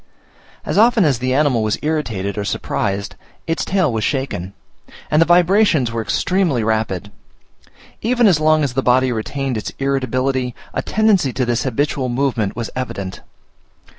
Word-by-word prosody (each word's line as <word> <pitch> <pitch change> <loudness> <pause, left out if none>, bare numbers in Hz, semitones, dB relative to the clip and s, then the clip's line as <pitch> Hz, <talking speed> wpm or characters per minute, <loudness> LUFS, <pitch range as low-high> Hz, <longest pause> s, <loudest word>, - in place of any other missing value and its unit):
As - - 0
often 225 -3 +5
as 135 -6 +1
the 130 0 -1
animal 135 -4 +2
was 110 -1 0
irritated 115 -11 -2
or 105 - -2
surprised, 100 0 -2 0.3
its 165 0 -1
tail 180 -9 +1
was 110 -1 -1
shaken; 130 -10 -2 0.6
and 155 - +4
the 165 - +4
vibrations 175 - +3
were 115 -1 -2
extremely 165 - 0
rapid. 110 -3 -1 0.9
Even 240 +1 +2
as 180 -7 +5
long 155 0 +3
as 135 -4 -1
the 135 - 0
body 130 0 +3
retained 125 +3 -3
its 105 - -4
irritability, 130 -2 -1 0.2
a - - -1
tendency 210 -10 +2
to 130 - 0
this 120 +1 -1
habitual 130 +1 -1
movement 120 -5 -1
was 115 -1 -4
evident. 100 -7 -5
130 Hz, 155 wpm, -19 LUFS, 115-155 Hz, 0.9 s, often